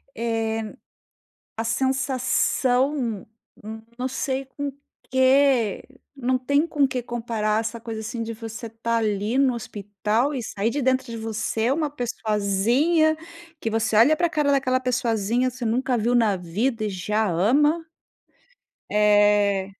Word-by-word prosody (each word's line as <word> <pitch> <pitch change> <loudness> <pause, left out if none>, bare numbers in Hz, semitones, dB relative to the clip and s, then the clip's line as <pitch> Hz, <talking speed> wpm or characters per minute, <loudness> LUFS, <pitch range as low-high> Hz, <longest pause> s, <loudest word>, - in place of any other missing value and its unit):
Eh, 225 -1 -2 0.8
a 225 - -1
sensação 255 -1 0 0.7
não 255 - -2
sei 265 +1 -2
com 280 +2 -5 0.4
que 260 -4 +3 0.3
não 255 -1 0
tem 285 +5 +2
com 290 -4 +2
que 255 -1 -3
comparar 225 -3 -1
essa 230 +1 -5
coisa, 225 -1 -6
assim, 230 +1 -4
de 230 0 -5
você 225 +1 -7
estar 230 +1 -2
ali 215 +1 0
no 270 -2 +3
hospital 210 +4 -2
e 260 - -3
sair 210 +1 -2
de 285 +4 -2
dentro 260 0 +1
de 230 -1 -6
você 225 +1 -1
uma 300 +1 0
pessoazinha 245 - +1 0.4
que 225 - -2
você 225 0 0
olha 245 +9 +6
para 345 +2 +1
a - - -9
cara 300 -3 +1
daquela 255 -2 +2
pessoazinha, 240 -1 0
você 250 -1 -7
nunca 250 +2 0
viu 235 +2 +1
na 220 -4 +3
vida 215 +7 -2
e 210 - -1
já 210 +3 -1
ama. 285 - +2 1.1
Eh, 205 -2 +3
235 Hz, 140 wpm, -24 LUFS, 215-260 Hz, 1.1 s, olha